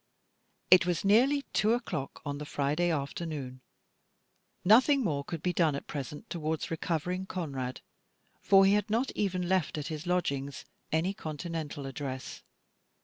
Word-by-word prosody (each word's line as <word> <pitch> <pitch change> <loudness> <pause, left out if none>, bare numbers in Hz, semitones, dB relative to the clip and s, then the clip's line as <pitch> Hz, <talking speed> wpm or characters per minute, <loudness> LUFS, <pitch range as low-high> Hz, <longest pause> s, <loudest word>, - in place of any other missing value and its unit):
It 180 -1 +8
was 175 +1 0
nearly 260 +8 +4
two 215 +2 +3
o'clock 180 - -4
on 145 -1 -3
the 150 - -5
Friday 150 +5 0
afternoon. 140 -3 -3 1.0
Nothing 260 +7 +6
more 145 -8 -1
could 160 +2 -6
be 180 - +1
done 160 -5 +2
at 140 - -5
present 145 - -6
towards 160 -2 -3
recovering 175 +3 -2
Conrad, 135 -9 -4 0.6
for 195 -1 +6
he 195 - +5
had 210 +1 +1
not 235 +5 +1
even 185 -3 -1
left 185 -5 +1
at 150 +1 -4
his 155 +1 -5
lodgings 140 -6 -1 0.3
any 165 +5 +1
Continental 155 -3 -5
address. 135 -1 -5
165 Hz, 145 wpm, -30 LUFS, 145-190 Hz, 1.0 s, It